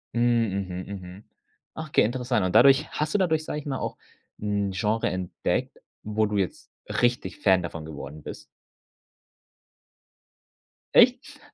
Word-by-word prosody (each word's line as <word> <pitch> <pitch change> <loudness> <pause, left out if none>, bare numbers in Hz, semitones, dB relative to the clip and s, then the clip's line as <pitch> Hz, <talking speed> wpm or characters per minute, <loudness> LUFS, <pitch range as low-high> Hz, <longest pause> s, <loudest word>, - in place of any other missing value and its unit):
Hm, 120 - +1 0.5
mhm, 90 +2 -6
mhm. 95 +1 -9 0.5
Okay, 155 -2 +1
interessant 120 -2 0
und 90 - -1
dadurch 135 -1 +6
hast 150 +1 -2
du - - +4
dadurch, 160 -5 +1
sage 150 - -3
ich 150 - -11
mal, 135 -3 -2
auch - - -4 0.4
‘n 100 -1 -1
Genre 110 +4 0
entdeckt, 90 0 -2 0.3
wo 110 +1 +1
du 105 -1 -2
jetzt 95 -4 -3 0.3
richtig 120 -7 0
Fan 95 -3 +4
davon 80 -2 -6
geworden 75 -1 -8
bist? - - -8 2.5
Echt? - - +4
105 Hz, 135 wpm, -26 LUFS, 90-130 Hz, 2.5 s, dadurch